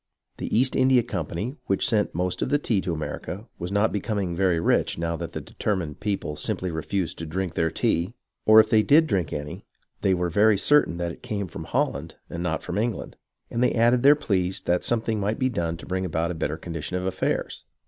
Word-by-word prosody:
The - - -1
East 130 +2 +2
India 130 -2 +4
Company, 100 - -4
which 95 - +2
sent 105 -7 +1
most 90 +1 -1
of - - 0
the 145 - +3
tea 115 -8 0
to 90 - -2
America, 85 +5 -5
was 85 +2 -4
not 105 +2 +2
becoming 100 -4 -2
very 90 -2 +2
rich - - +1
now 85 0 -1
that - - -6
the - - -4
determined 90 -8 -3
people 100 -7 -2
simply 90 +4 -2
refused 85 +3 -2
to 80 - -4
drink 90 +2 -2
their 80 0 +1
tea, 85 +2 0 0.3
or 110 0 +9
if 110 - +4
they 110 - +6
did 150 +8 +5
drink 95 - 0
any, 75 0 -5 0.4
they 95 -1 +3
were 90 -1 -1
very 105 +3 +4
certain 145 -6 +3
that 85 -1 -2
it - - -12
came 100 -3 -3
from - - -8
Holland - - -1 0.2
and 85 - -4
not 85 -2 -2
from 90 - -2
England, 115 +1 -2 0.4
and 115 - -1
they 125 - +3
added 120 +2 +4
their 140 +3 +7
pleas 95 -10 0
that 90 0 0
some 120 -2 +1
thing 110 -1 -1
might 105 +2 -1
be 130 - +1
done 85 -7 -2
to - - -11
bring 95 0 -2
about 85 -1 -1
a - - -2
better 80 -1 -2
condition 85 +1 -4
of 90 - -3
affairs. 95 0 -2
95 Hz, 220 wpm, -25 LUFS, 85-110 Hz, 0.4 s, or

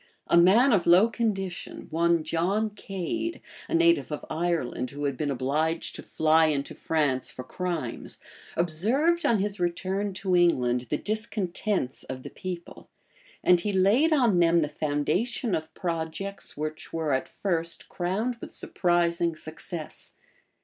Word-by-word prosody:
A - - +2
man 210 +10 +6
of 185 -5 +2
low 180 +6 +7
condition, 195 -6 -3
one 170 0 +2
John 185 +7 0
Cade, 200 - -4 0.3
a 335 - +1
native 335 - +3
of 150 - -4
Ireland, 160 -7 -1
who 145 +2 -5
had 140 -1 0
been 145 +3 -2
obliged 145 +5 -1
to - - -7
fly 160 +1 +3
into 140 -2 -1
France 145 -5 0
for 130 - -8
crimes, 165 -4 -4 0.4
observed, 240 - +2
on 230 - +4
his 200 0 -2
return 190 +3 -1
to 190 -1 0
England, 125 -8 +2
the - - +1
discontents 210 - -2
of 130 0 -7
the - - -8
people; 180 -2 -7 0.5
and 180 -1 +5
he 205 +4 -1
laid 205 - +4
on 240 - +4
them 170 -1 +4
the 150 - -2
foundation 170 - -1
of 155 0 -2
projects 170 +2 -4
which 155 +1 -5
were 160 -3 -1
at 130 - -1
first 170 -4 -2
crowned 205 +8 -2
with - - -8
surprising 170 -1 +1
success. 155 +1 -6
175 Hz, 145 wpm, -27 LUFS, 155-200 Hz, 0.5 s, low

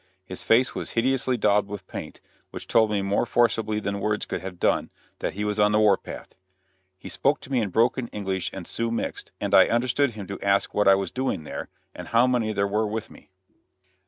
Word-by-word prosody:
His 95 0 -7
face 125 +3 +3
was - - -5
hideously 130 +1 +1
daubed 105 -2 +2
with 100 -2 -7
paint, - - -8 0.3
which - - -8
told 110 -2 +4
me 100 -2 0
more 100 +1 +1
forcibly 110 -2 +1
than 100 -1 -3
words 105 +1 -1
could - - -4
have 90 -2 -8
done - - +1 0.3
that - - -2
he 105 +3 -4
was 105 0 -1
on 105 0 +4
the 105 - +4
war 105 -2 +5
path. - - -10 0.6
He - - -11
spoke 140 +2 +1
to 140 - -12
me 125 -3 +2
in 105 - -1
broken 120 +5 +1
English 95 -4 -3
and 95 -3 -7
Sioux 115 +6 -2
mixed, 115 - -4
and - - -3
I - - +7
understood 125 +2 +1
him 105 -2 -7
to 100 +1 -7
ask 100 0 +1
what 105 - +2
I 95 - +8
was 95 0 -3
doing 130 -11 -2
there, - - -6 0.2
and - - -9
how 115 +2 +4
many 120 -4 +1
there 100 -1 0
were 105 +2 0
with 110 +1 -5
me. - - -17
105 Hz, 220 wpm, -25 LUFS, 100-115 Hz, 0.6 s, I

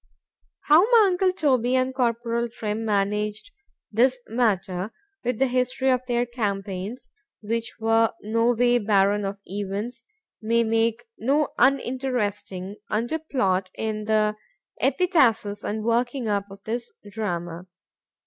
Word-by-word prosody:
How 305 +2 +6
my 465 -3 +7
uncle 370 +1 +2
Toby 260 -8 +1
and 260 0 +1
Corporal 235 -1 0
Trim 220 -1 -4
managed 210 0 -1 0.4
this 250 +4 +3
matter,—with 225 - -2
the 270 - +3
history 255 +1 +1
of 250 -1 +2
their 240 -1 +1
campaigns, 205 -2 -4 0.3
which 230 +2 -2
were 225 0 +3
no 230 +3 +2
way 245 +1 +3
barren 205 -1 +2
of 195 +1 -3
events,——may 230 - -3
make 225 +1 +1
no 285 +6 +2
uninteresting 240 -7 0
under 235 +9 -1
plot 195 -12 0
in 215 -1 -3
the 215 -1 +2 0.5
epitasis 265 - +2
and 215 +1 -3
working 240 +2 0
up 200 -1 0
of 195 0 -13
this 235 +2 -4 0.2
drama. 175 -4 -4
230 Hz, 120 wpm, -25 LUFS, 205-255 Hz, 0.5 s, my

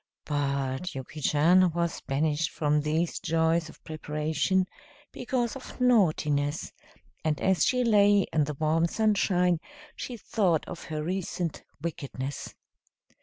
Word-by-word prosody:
But 140 +1 -2
Yuki 135 +3 -7
Chan 170 +5 +4
was 170 -1 -1
banished 150 +2 0
from 150 -1 +1
these 160 +3 -1
joys 165 -1 +1
of - - -16
preparation 155 +4 0 0.5
because 245 -1 -2
of 270 - -10
naughtiness, 155 - +2 0.5
and 155 -2 0
as 190 -5 +2
she 250 0 +2
lay 205 -3 +5
in 155 -2 +3
the 150 0 -4
warm 160 +3 +2
sunshine 190 -4 +2 0.4
she 245 - -6
thought 185 -8 0
of 170 - -7
her 155 -1 -4
recent 175 -1 -3 0.2
wickedness. 140 -4 -5
160 Hz, 125 wpm, -28 LUFS, 150-190 Hz, 0.5 s, lay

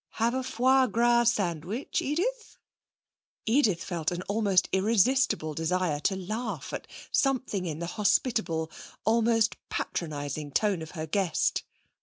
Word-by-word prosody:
Have 230 +1 +1
a 260 - 0
foie 260 +1 +3
gras 235 +2 +3
sandwich, 180 - -2
Edith?' 435 - -2 0.9
Edith 220 -7 +2
felt 170 -4 -2
an 175 +1 -4
almost 200 -2 +2
irresistible 220 - +2
desire 165 0 0
to 190 +6 0
laugh 190 - -4
at - - -5 0.2
something 250 -9 0
in 155 -2 -3
the 170 - -4
hospitable, 180 -4 0 0.3
almost 225 0 +3
patronising 145 -2 -4
tone 205 -5 +1
of 160 - -7
her 155 - -3
guest. 175 0 0
200 Hz, 125 wpm, -28 LUFS, 170-235 Hz, 0.9 s, foie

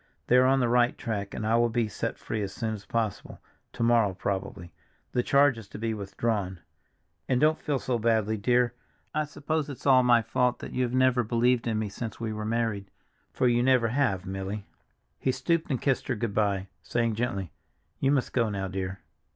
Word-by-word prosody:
They 125 - +4
are 130 0 +6
on 135 0 +3
the 125 - +2
right 120 +1 +3
track 100 -3 -4
and 110 - -3
I 110 +1 +2
will 120 0 +3
be 115 -1 0
set 105 - -4
free 110 - -4
as 100 -1 -3
soon 110 +1 -3
as 100 -2 -9
possible, 110 -4 -3 0.3
to - - -2
morrow, 115 -5 +3
probably; 95 -3 -4 0.4
the 125 - +1
charge 140 -1 +4
is 110 - -11
to - - -9
be 115 +1 -2
withdrawn. 100 -2 -2 0.7
And 125 - +3
don't 155 +2 +3
feel 145 -2 0
so 125 -2 -1
badly, 110 -1 +2
dear, 120 +3 +2 0.4
I 155 0 0
suppose 150 +1 -2
it's 140 - -9
all 130 -2 +6
my 120 -2 +4
fault 125 +1 +1
that - - -8
you 130 - 0
have 125 -1 0
never 130 -1 +4
believed 120 +2 +1
in 110 -2 0
me 110 -1 -1
since 110 +3 -6
we 115 -2 -3
were 105 0 -4
married—for 115 +2 -3
you 120 0 +3
never 125 -2 +3
have, 110 -8 0
Milly." 95 +1 -4 0.5
He 130 - +1
stooped 165 +4 0
and 130 -4 0
kissed 135 -3 0
her 125 - 0
good 115 -2 -3
by, 100 -3 +1 0.2
saying 115 -1 0
gently, 105 - -2 0.5
"You 135 - +2
must 135 -3 0
go 115 -3 +2
now, 100 -2 -3
dear." 95 0 -4
115 Hz, 205 wpm, -28 LUFS, 105-125 Hz, 0.7 s, are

